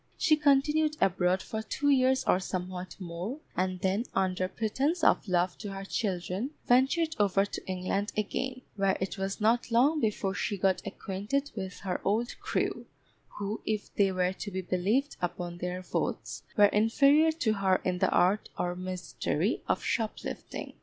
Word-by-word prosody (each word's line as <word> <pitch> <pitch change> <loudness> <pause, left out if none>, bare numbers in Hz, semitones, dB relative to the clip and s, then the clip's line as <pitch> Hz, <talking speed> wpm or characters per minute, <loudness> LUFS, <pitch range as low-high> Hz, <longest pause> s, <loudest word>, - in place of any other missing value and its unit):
She 310 - +4
continued 300 +1 +3
abroad 185 -1 +2
for 220 - -4
two 285 +6 -1
years 260 -1 +3
or 180 - +3
somewhat 185 0 -5
more; 180 - -5 0.2
and 185 0 -1
then, 195 +5 +1
under 185 -1 +1
pretence 270 - -1
of - - +4
love 180 -1 +1
to 205 -2 -5
her 195 0 -6
children, 190 +3 -2 0.2
ventured 275 +6 +3
over 200 -1 +3
to - - -7
England 190 +2 -1
again, 255 +4 -2
where 195 -1 +1
it 190 +1 -3
was 195 +2 -2
not 230 +3 +2
long 265 +7 +4
before 210 -5 0
she 205 0 -2
got 190 0 +2
acquainted 210 +10 -3
with 190 -1 -6
her 185 -2 -2
old 225 +4 0
crew, - - -2 0.5
who, 205 +2 -3
if 215 -1 -3
they 195 -2 +3
were 185 0 +1
to 205 - -6
be 190 -1 -3
believed 200 +11 0
upon 175 0 -3
their 180 +1 -3
oaths, - - -2 0.2
were 205 - +8
inferior 275 +10 +4
to 250 -9 +1
her 190 -2 +2
in 180 -1 0
the - - +3
art 195 +4 +2
or 175 0 -1
mystery 185 - -2
of - - 0
shoplifting. 220 -2 -3
200 Hz, 165 wpm, -29 LUFS, 185-245 Hz, 0.5 s, were